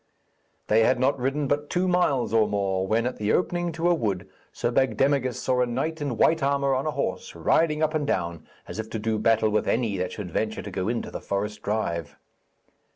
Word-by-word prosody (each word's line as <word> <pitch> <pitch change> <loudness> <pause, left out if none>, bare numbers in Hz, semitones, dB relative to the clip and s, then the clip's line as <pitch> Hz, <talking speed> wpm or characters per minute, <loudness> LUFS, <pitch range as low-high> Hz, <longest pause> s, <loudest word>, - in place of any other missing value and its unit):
They 110 +1 +4
had 125 +3 +3
not 135 +1 +2
ridden 135 +3 0
but 145 +2 -1
two 185 +1 +1
miles 160 -10 +1
or 110 -1 +4
more, 95 -2 -1
when 115 +3 +1
at 125 - -2
the 105 0 0
opening 175 -1 0
to 165 +2 0
a 175 - +5
wood 100 - -2 0.2
Sir 120 - -2
Bagdemagus 130 +1 +1
saw 125 -1 +1
a 125 - +2
knight 150 +7 -2
in 140 -6 -2
white 160 +7 +3
armour 140 0 +2
on 135 +3 -1
a - - +1
horse, - - -3
riding 155 -1 +2
up 155 0 +1
and 150 -2 -1
down 85 - -2 0.2
as - - -7
if 110 0 -4
to - - -3
do 110 0 -1
battle 110 0 +3
with 105 -1 +1
any 110 -4 +1
that 90 0 -2
should 95 -5 -6
venture 110 +5 -2
to 100 - -7
go 95 +1 -2
into 115 +1 -2
the - - -6
forest 105 +2 -3
drive. 85 -7 -2
120 Hz, 220 wpm, -26 LUFS, 105-145 Hz, 0.2 s, a